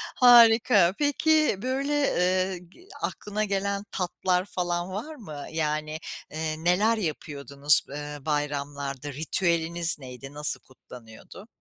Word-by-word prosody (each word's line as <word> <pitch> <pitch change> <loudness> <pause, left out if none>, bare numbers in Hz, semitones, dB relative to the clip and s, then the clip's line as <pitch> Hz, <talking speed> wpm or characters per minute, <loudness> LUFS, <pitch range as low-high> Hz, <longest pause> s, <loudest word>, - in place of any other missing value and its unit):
Harika. 225 -7 +7
Peki, 305 -1 +3
böyle, 270 +4 -1
eee, 185 -8 +1
g. 360 - -20
aklına 210 +1 -3
gelen 200 0 -1
tatlar 180 0 -1
falan 175 -2 -2
var 240 +11 -5
mı? 155 - -8
Yani, 155 -1 -2 0.3
eee, 155 0 -4
neler 205 +7 +3
yapıyordunuz, 145 -5 0
eee, 145 +1 -6
bayramlarda? 145 -1 -3
Ritüeliniz 170 +2 0
neydi? 135 +1 -10
Nasıl 150 0 -2
kutlanıyordu? 125 - -14
175 Hz, 110 wpm, -26 LUFS, 150-205 Hz, 0.3 s, Harika